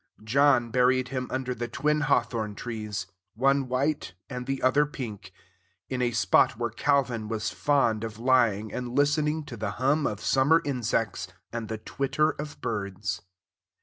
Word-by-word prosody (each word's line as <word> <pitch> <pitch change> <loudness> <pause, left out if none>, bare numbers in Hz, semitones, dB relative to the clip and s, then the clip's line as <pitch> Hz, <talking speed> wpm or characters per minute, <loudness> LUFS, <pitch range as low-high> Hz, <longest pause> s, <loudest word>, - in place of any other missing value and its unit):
John 125 0 +3
buried 125 0 +3
him 130 -1 -3
under 130 -1 -2
the 120 0 -4
twin 150 +5 0
hawthorn 120 -6 0
trees, 105 -4 -4 0.3
one 135 +3 +2
white 130 -5 -1 0.2
and 125 -1 -5
the 135 -1 -2
other 135 +3 +5
pink, 105 -10 -7 0.6
in 130 -1 -2
a 120 - +2
spot 105 -1 +3
where 120 -1 -2
Calvin 125 -3 +1
was 110 -1 -2
fond 120 -7 +1
of 110 -2 -5
lying 115 -4 +2
and 125 -1 -4
listening 150 +2 +2
to 135 -4 -8
the 105 -1 -3
hum 140 +4 +2
of 105 - -3
summer 140 +8 +4
insects 115 -7 -1 0.3
and 115 -2 -4
the 110 - -3
twitter 140 +7 0
of 150 0 -8
birds. 100 -4 -3
125 Hz, 155 wpm, -27 LUFS, 110-140 Hz, 0.6 s, other